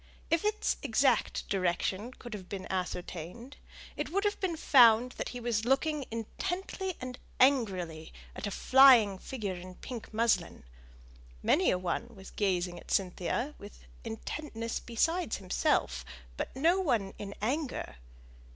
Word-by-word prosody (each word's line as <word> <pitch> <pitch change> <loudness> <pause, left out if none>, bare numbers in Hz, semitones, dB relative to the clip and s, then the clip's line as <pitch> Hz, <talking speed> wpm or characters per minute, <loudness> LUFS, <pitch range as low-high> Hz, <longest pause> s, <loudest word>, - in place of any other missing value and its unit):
If 330 0 +3
its 425 0 0
exact 260 -2 +1
direction 190 +4 -1
could 240 -2 -9
have 190 -4 -8
been 195 -2 -5
ascertained, 185 - -5 0.4
it - - -3
would 395 +4 0
have 415 0 0
been 355 -4 -1
found 245 -5 +6
that - - -5
he 245 - -6
was 230 -2 0
looking 275 +3 +1
intently 355 - -4
and 255 0 -6 0.2
angrily 190 - +2 0.2
at - - -4
a - - -2
flying 240 -4 +6
figure 210 -6 -4
in 180 +1 -9
pink 240 +1 -8
muslin: 230 +1 +1 0.8
many - - +4
a - - +2
one 205 +6 -3
was 190 0 -12
gazing 180 -3 -1
at - - -16
Cynthia 195 - -1
with 205 - -12 0.2
intentness 230 +1 -4
besides 325 +5 0
himself, 70 - 0 0.3
but - - -5
no 335 +8 +3
one 230 - 0
in 200 -1 -6
anger. 265 +6 -2
230 Hz, 140 wpm, -31 LUFS, 190-275 Hz, 0.8 s, found